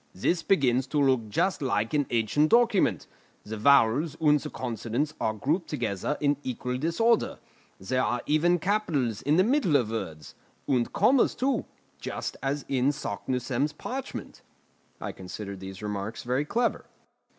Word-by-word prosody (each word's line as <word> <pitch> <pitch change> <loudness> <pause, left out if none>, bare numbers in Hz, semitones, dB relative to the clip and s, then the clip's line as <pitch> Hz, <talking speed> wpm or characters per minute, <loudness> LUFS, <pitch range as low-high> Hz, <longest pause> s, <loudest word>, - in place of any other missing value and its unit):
"This 170 - 0
begins 130 -7 +2
to 150 - 0
look 130 -6 +2
just 185 - 0
like 115 -5 0
an 145 -3 +1
ancient 120 +7 +2
document: 225 - +3 0.4
the 110 - -6
vowels 140 +6 +3
and 150 -2 +4
the - - -6
consonants 120 +4 -3
are 110 - 0
grouped 160 - -1
together 120 0 -2
in 145 -1 +2
equal 125 -1 -3
disorder; 210 - +1 0.4
there 130 +7 0
are 120 0 -1
even 170 +4 +3
capitals 160 - 0
in 150 +4 +2
the 185 - +6
middle 230 - +2
of 120 -6 +2
words, 80 -9 -5 0.3
and 125 -3 +1
commas 235 +6 +3
too, 270 +1 0 0.3
just - - -4
as 140 +1 -2
in 130 0 +2
Saknussemm's 130 +3 -2
parchment." 260 - -6 0.6
I - - -4
considered 100 +1 -7
these 95 +1 -8
remarks 105 +2 -4
very 125 +4 0
clever. 235 +9 0
135 Hz, 150 wpm, -27 LUFS, 115-160 Hz, 0.6 s, the